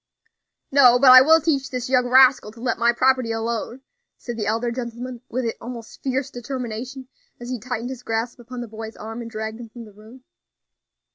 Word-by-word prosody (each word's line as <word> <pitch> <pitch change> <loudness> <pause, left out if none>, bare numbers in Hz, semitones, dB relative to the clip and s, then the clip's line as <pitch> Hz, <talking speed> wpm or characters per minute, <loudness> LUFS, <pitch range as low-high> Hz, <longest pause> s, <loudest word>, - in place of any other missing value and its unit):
"No; 255 -3 +6
but 260 0 +7
I 255 0 +11
will 320 +4 +6
teach 290 -4 -1
this 250 -1 -4
young 255 -1 +2
rascal 255 -3 +5
to 230 - -16
let 250 +1 -2
my 235 0 +4
property 255 -1 +1
alone," 230 +2 -3 0.4
said 240 - -7
the 220 -2 -3
elder 230 +2 -1
gentleman 240 0 -6
with 255 +1 -2 0.2
almost 235 -1 -9
fierce 265 0 -2
determination, 250 +1 -6 0.3
as 240 0 -8
he 250 - -3
tightened 245 +1 -5
his 255 -2 -8
grasp 230 +1 -3
upon 245 +1 -8
the 240 - -6
boy's 220 0 -8
arm 225 +2 -7
and 230 - -7
dragged 220 0 -6
him 235 -2 -9
from 235 +1 -11
the 210 - -16
room. 220 +5 -16
240 Hz, 195 wpm, -22 LUFS, 230-255 Hz, 0.4 s, I